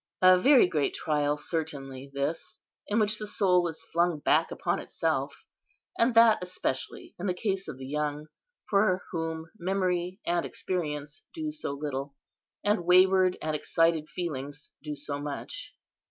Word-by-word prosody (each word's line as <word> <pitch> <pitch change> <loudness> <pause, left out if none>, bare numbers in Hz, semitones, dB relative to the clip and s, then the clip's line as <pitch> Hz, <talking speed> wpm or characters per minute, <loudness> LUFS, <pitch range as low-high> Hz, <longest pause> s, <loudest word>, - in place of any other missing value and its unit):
A 185 0 +9
very 265 +3 +7
great 150 -5 0
trial 150 -1 0
certainly 140 -5 -4
this, 140 +4 -3 0.3
in 210 - 0
which 215 -1 +2
the 210 - -4
soul 180 -4 +3
is 160 0 -7
flung 170 -1 +2
back 145 - +2
upon - - -1
itself; - - -2 0.5
and 230 +1 +2
that 230 -1 +7
especially 180 -7 -3
in 190 - -2
the 180 - 0
case 195 0 -2
of 150 -4 -6
the 130 - -8
young, 150 +1 -2 0.4
for 195 -2 +2
whom 165 -1 -4
memory 180 0 -1
and 175 0 +1
experience 150 -5 -4
do 310 -2 -3
so 305 - -4
little, 140 -1 -4 0.5
and 205 -3 +2
wayward 185 +1 +5
and 155 0 -1
excited 165 0 +1
feelings 145 -4 -5
do 150 0 -5
so 145 0 -4
much. 150 - -6
170 Hz, 150 wpm, -28 LUFS, 150-190 Hz, 0.5 s, A